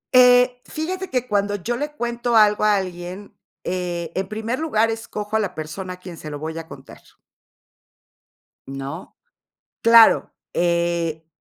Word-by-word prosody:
Eh, 250 0 +6
fíjate 370 +4 -4
que 250 -1 -1
cuando 205 -1 0
yo 215 +5 -3
le 295 +4 -4
cuento 240 -3 -2
algo 210 -1 +5
a 210 -1 +5
alguien, 185 +1 -5 0.3
eh, 175 -2 -3
en 190 0 -2
primer 220 +4 -3
lugar, 225 -8 +1
escojo 220 -1 -5
a - - +4
la 195 -4 -2
persona 170 +4 -6
a - - -11
quien 180 -2 -10
se 155 - -8
lo 145 - -5
voy 160 +2 -5
a 165 - -9
contar. - - -13 1.7
¿No? 135 +5 -7 0.6
Claro, 230 -1 +6 0.2
eh, 170 -2 0
205 Hz, 145 wpm, -22 LUFS, 170-235 Hz, 1.7 s, Eh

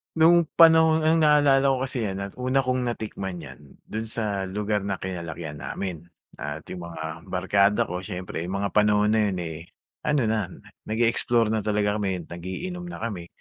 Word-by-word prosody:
No'ng 170 +2 +6 0.2
panahon 160 -1 +6
ang 160 0 +4
naaalala 140 -2 +5
ko 130 - +1
kasi 125 -3 -2
'yan 95 -1 -3
at 100 0 -6
una 130 +2 +1
kong 130 -1 0
natikman 100 -6 -4
'yan, 75 -3 -13
do'n 110 +1 -3
sa 105 -3 -2
lugar 105 +1 -1
na 100 -1 -2
kinalakihan 85 -4 -5
namin 85 +3 -5 0.3
at 75 +2 -6
yung 90 -1 -7
mga 85 -1 -6
barkada 100 +2 +2
ko 90 +1 -4
siyempre 90 -4 -5
yung 95 +3 -3
mga 100 0 -1
panahon 105 0 +4
na 110 -1 +3
yun 90 - -3
eh, 80 -2 -5 0.5
ano 150 -2 +3
na 110 -4 0 0.4
nag-e-explore 115 +1 +2
na 110 - +1
talaga 105 -1 +1
kami, 95 -4 -2
nag-iinom 95 - -6
na - - -7
kami. 95 -7 -4
105 Hz, 175 wpm, -25 LUFS, 90-125 Hz, 0.5 s, No'ng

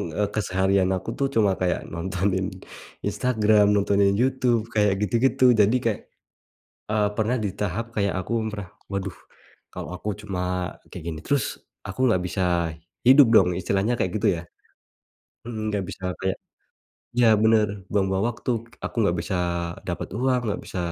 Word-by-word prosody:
eee, 105 -1 0
keseharian 95 -2 +1
aku 95 0 -5
tuh 140 - +2
cuma 105 -3 +4
kayak 90 -1 +1
nontonin 95 +2 -1 0.6
Instagram, 110 -4 +3
nontonin 100 0 +3
YouTube 125 -3 +2
kayak 105 -3 +3
gitu-gitu. 120 +6 +2 0.2
Jadi 105 +4 +5
kayak, 115 -3 0 0.9
eee, 105 -1 +2
pernah 110 +3 +1
di 105 - -1
tahap 105 +2 -2
kayak 100 -2 +1
aku 95 - -8 0.2
pernah, 100 -4 -6 0.2
"Waduh, 100 -2 -3 0.6
kalau - - -6
aku 105 +4 -5
cuma 95 -4 -4 0.5
kayak - - -7
gini 80 - -5
terus, 140 -4 +1 0.4
aku - - -7
nggak 110 -7 +3
bisa 95 +2 -3 0.7
hidup, 135 +2 +9
dong.", 95 -5 +6
istilahnya 100 +5 0
kayak 95 - 0
gitu, 110 - +3
ya. - - -5 1.1
Mhm, 115 -2 -5
nggak 100 -2 -1
bisa 95 - -8
kayak 95 - -2 0.8
ya, 120 -1 +5
bener, 110 -1 +5 0.2
buang-buang 95 -1 +1
waktu, 120 - -5 0.3
aku - - -5
nggak 90 -4 +2
bisa 95 - -3 0.5
dapet - - -3
uang, 130 -1 +2
nggak - - -3
bisa - - -5
105 Hz, 150 wpm, -24 LUFS, 95-115 Hz, 1.1 s, hidup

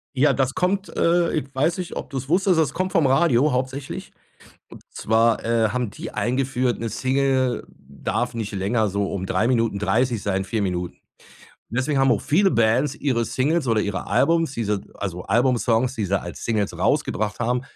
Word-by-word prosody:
Ja, 135 +1 +4
das 135 -1 0
kommt, 190 +2 0
äh, 170 0 +2
ich 150 -4 -1
weiß 155 +7 +1
nicht, 180 -2 -5
ob - - -5
du's 135 -1 -5
wusstest 180 0 +3
das 150 -3 +1
kommt 185 +1 -2
vom 165 -6 +3
Radio 135 0 +3
hauptsächlich. 130 +2 -4 0.6
Und - - -13
zwar, 115 +1 +1
äh, 115 -2 +2
haben 125 -2 -2
die - - -8
eingeführt, 130 0 0
'ne 115 -1 -3
Single 130 +1 0
darf 70 - -3
nicht 110 -2 -4
länger 105 +3 0
so 100 0 -1
um 95 -1 -3
3 110 +4 0
Minuten 115 -4 +1
30 110 +3 0
sein, 95 -1 -1
4 110 +1 -2
Minuten. 90 -2 -2 0.7
Und 115 - -2
deswegen 135 +1 0
haben 135 0 +4
auch - - 0
viele 190 +6 +3
Bands 120 +4 +2
ihre 120 -5 0
Singles 135 +6 0
oder 115 -3 +2
ihre 100 -2 -3
Albums, 165 -3 +2
diese 105 -5 -2
also 90 -3 -5
Album-Songs, 120 +2 +2
die 110 - -2
sie 95 0 0
als 85 - -8
Singles 110 -3 -1
rausgebracht 105 0 0
haben, 125 +2 0
125 Hz, 180 wpm, -23 LUFS, 110-135 Hz, 0.7 s, Ja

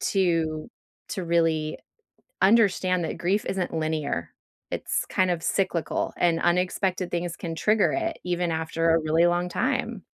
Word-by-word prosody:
to 165 -2 0 0.4
to 185 -4 -4
really 165 -2 +1 0.7
understand 190 -4 +4
that - - -3
grief 195 +4 0
isn't 185 -2 -2
linear. 155 - -2 0.4
It's - - -2
kind 185 -1 +1
of 165 -2 -1
cyclical, 180 -4 -1
and 165 -1 +2
unexpected 180 +1 0
things 175 0 -2
can 165 -2 -5
trigger 210 +4 +2
it 330 -1 -2
even 175 -1 -1
after 160 +1 0
a 165 - +3
really 160 +2 +2
long 175 +1 +1
time. - - -1
175 Hz, 140 wpm, -26 LUFS, 165-185 Hz, 0.7 s, understand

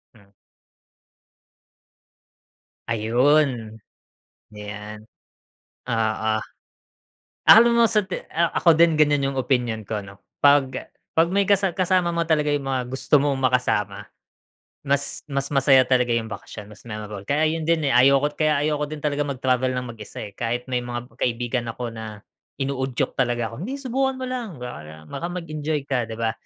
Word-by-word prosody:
Hmm. 100 -2 -22 2.6
Ayun. 120 0 +2 0.8
Ayan. 105 0 -8 0.9
Oo. 110 -1 0 1.1
Akala 235 +2 +9
mo 235 0 +5
sa 215 - +3
te - - -5
ah, 170 +1 +2
ako 170 - +5
din 170 -1 +5
ganyan 145 -2 +3
yung - - -3
opinyon 120 -4 0
ko, 105 +1 -3
'no. 100 0 -12 0.2
'Pag 140 -2 +3 0.2
'pag 165 +1 +3
may 200 +2 +2
kasa 195 -2 +2
kasama 180 -2 +1
mo 170 0 +1
talaga 155 -2 +1
yung 145 -1 0
mga 130 -2 -2
gusto 135 +3 +2
mong 140 -1 +1
makasama, 125 -6 0 0.8
mas 140 0 -1
mas 140 0 -2
masaya 135 -1 +5
talaga 125 -1 +2
yung 110 -1 -3
bakasyon, 105 +1 -9
mas 105 - -17
memorable. 105 -2 -6
Kaya 150 +2 +2
ayun 160 0 -1
din 165 -3 +2
eh, - - +1
ayoko 140 +4 +4
kaya 150 -2 +1
ayoko 150 -1 0
din 155 -1 -7
talaga 145 -1 0
mag-travel 130 -1 0
ng 125 - -3
mag-isa, 105 -2 -8
eh. 100 - -10
Kahit 120 +3 -3
may 125 -1 -1
mga 120 0 -5
kaibigan 120 0 -1
ako 115 0 -5
na 110 -2 -8 0.3
inuudyok 135 -1 -2
talaga 120 -3 0
ako, 140 +11 -6
"Hindi, 265 +5 -4
subukan 265 +1 0
mo - - -2
lang 245 -3 -4
baka 80 -10 -8
baka 140 - -5
mag-enjoy 155 -4 -3
ka, 125 -5 -1
'di 110 - -5
ba?" 115 -1 0
130 Hz, 155 wpm, -23 LUFS, 115-155 Hz, 2.6 s, Akala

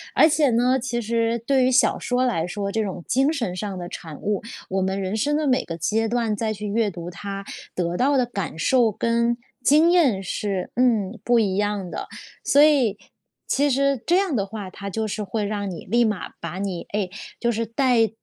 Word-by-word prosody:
而 315 - +7
且 300 -3 +3
呢， 245 +3 +3
其 240 -1 -2
实 230 +1 0
对 270 -2 +4
于 260 - +3
小 255 - +4
说 250 +1 0
来 175 -10 0
说， 200 +2 -3
这 220 -1 +1
种 185 -3 -5
精 270 +5 +3
神 230 - -2
上 195 -1 -4
的 175 -1 -5
产 160 -4 -8
物， 205 -1 -1 0.3
我 190 0 0
们 190 +1 -1
人 190 +3 -2
生 295 +7 +1
的 310 - 0
每 260 0 +2
个 165 -1 -6
阶 220 +7 0
段 230 -3 0
再 220 +1 -1
去 210 0 -6
阅 220 +1 +1
读 175 0 -7
它， 195 +2 -6 0.3
得 175 -1 -1
到 275 +2 +3
的 250 - +3
感 195 -9 -5
受 240 +2 +3
跟 235 +2 +1 0.3
经 315 +4 +5
验 270 - +3
是 195 0 -3
嗯， 230 -4 +2
不 240 -1 +4
一 195 -4 +1
样 205 -2 -1
的。 - - -5 0.4
所 285 - +5
以， 265 -9 +4 0.5
其 285 +1 +2
实 275 -2 +1
这 350 +2 +4
样 380 -8 +1
的 200 -3 0
话， 200 -2 -7
它 200 +1 -7
就 220 +2 -2
是 210 +1 -3
会 205 +2 -2
让 200 -2 -3
你 165 - -8
立 235 +5 +3
马 210 -4 -1
把 170 +3 -5
你 190 -4 -3
哎， 200 -3 -1 0.3
就 235 - 0
是 230 +1 -1
带 230 -1 +2
220 Hz, 225 characters per minute, -23 LUFS, 195-250 Hz, 0.5 s, 而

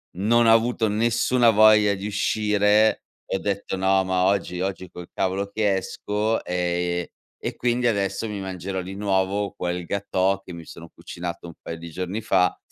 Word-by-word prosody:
non 115 +6 +3
ho 115 - +7
avuto 115 0 +2
nessuna 115 +3 +2
voglia 105 -1 +6
di 95 +2 -5
uscire 105 +1 +2 0.2
e - - -3
ho - - -1
detto: 100 -1 -3
"No, 95 0 +2
ma 95 0 +1
oggi 95 -2 0
oggi 95 -1 -4
col 90 0 -10
cavolo 95 +1 -1
che 105 -3 +1
esco", 105 +3 -2
ehm, 90 0 -1 0.4
e - - -3
quindi 120 0 +1
adesso 100 0 -1
mi 105 -1 -5
mangerò 95 0 -4
di 95 +2 -7
nuovo 100 0 0
quel 90 0 -3
gâteau 95 0 0
che 90 - -9
mi 85 -1 -8
sono 85 +1 -11
cucinato 85 0 -7
un 85 - -10
paio 85 - -6
di 85 +1 -9
giorni 95 +5 -4
fa, 95 -4 +2
100 Hz, 175 wpm, -24 LUFS, 90-105 Hz, 0.4 s, ho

